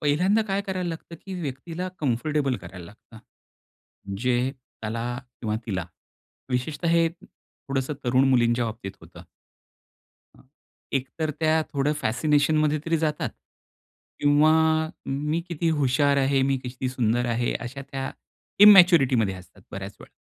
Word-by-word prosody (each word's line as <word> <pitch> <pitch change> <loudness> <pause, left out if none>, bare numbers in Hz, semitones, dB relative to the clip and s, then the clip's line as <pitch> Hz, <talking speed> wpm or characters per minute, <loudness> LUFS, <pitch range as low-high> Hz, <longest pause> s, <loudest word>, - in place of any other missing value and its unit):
पहिल्यांदा 180 +9 +2
काय 195 +1 0
करायला 185 -2 -3
लागतं, 165 0 -7
की 190 - -5
व्यक्तीला 165 +5 -5
कम्फर्टेबल 140 0 0
करायला 90 -2 -10
लागतं. 110 +2 -16 1.0
जे, 125 +2 +1 0.3
त्याला 115 +2 -3 0.4
किंवा 105 -2 -1
तिला. 95 -6 -3 0.6
विशेषतः 145 +7 -2
हे, 165 0 +4
थोडंसं 150 -5 -6
तरुण 130 +2 +3
मुलींच्या 120 -2 +3
बाबतीत 110 -3 -6
होतं. - - -14 1.1
हं. - - -19 0.5
एकतर 140 +4 -2
त्या 160 0 +3
थोडं 140 +1 +1
फॅसिनेशन 145 +6 +2
मध्ये 155 0 +2
तरी 165 - +2
जातात. 150 -1 -1 0.9
किंवा 145 +2 +5 0.5
मी 150 +4 -1
किती 170 -1 -1
हुशार 140 +1 +3
आहे, 135 0 +2
मी 135 0 +2
किती 130 +1 -4
सुंदर 120 -1 0
आहे, 120 +1 0
अशा 125 +4 -6
त्या, 135 -1 -3 0.5
इन्मॅच्युरिटी 180 -10 +8
मध्ये 105 -4 +1
असतात 95 +1 -14
बऱ्याच 100 +1 -6
वेळा. - - -13
135 Hz, 130 wpm, -25 LUFS, 120-155 Hz, 1.1 s, इन्मॅच्युरिटी